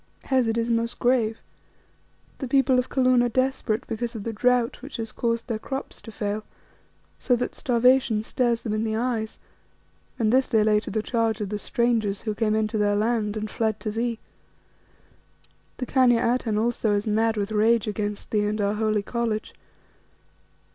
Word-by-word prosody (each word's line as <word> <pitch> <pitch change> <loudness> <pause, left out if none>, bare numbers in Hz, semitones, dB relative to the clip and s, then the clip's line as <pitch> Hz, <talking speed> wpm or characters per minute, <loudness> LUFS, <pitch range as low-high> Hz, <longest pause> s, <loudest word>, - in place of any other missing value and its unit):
"Hes, 260 -3 +2
it 225 +1 0
is 230 +1 0
most 230 0 0
grave. 240 -3 +2 1.0
The 265 - -3
people 260 -1 +3
of 250 - -2
Kaloon 255 -2 +3
are 245 - +2
desperate 255 -2 0
because 235 +1 -4
of 215 - -5
the 230 - -3
drought 245 +2 +1
which 275 +3 -7
has 225 -1 -4
caused 230 -1 -1
their 225 -3 -3
crops 270 +4 -6
to 225 - -10
fail, 210 0 -3 0.8
so 250 - +2
that 245 - -3
starvation 245 -3 +2
stares 235 0 0
them 215 - -2
in 215 +1 0
the 220 -1 -1
eyes, 225 -2 -2 0.8
and 225 -2 +1
this 260 0 +4
they 220 -3 +3
lay 210 0 +4
to - - -8
the 220 -1 -2
charge 225 -3 0
of 205 -2 -3
the 210 0 -3
strangers 225 -4 0
who 215 - -2
came 215 0 0
into 215 0 0
their 205 0 +2
land 215 0 0
and 215 -1 -4
fled 220 -2 -1
to 215 - -3
thee. 230 +1 -1 1.6
The 255 - -3
Khania 245 -2 +3
Atene 225 -4 -1
also 225 -1 +1
is 205 0 0
mad 220 +1 +1
with 205 +1 -2
rage 220 +1 +3
against 210 0 -4
thee 210 -1 +2
and 215 +1 -2
our 200 0 +1
holy 215 -1 0
College. 230 -1 -2
225 Hz, 180 wpm, -25 LUFS, 215-240 Hz, 1.6 s, this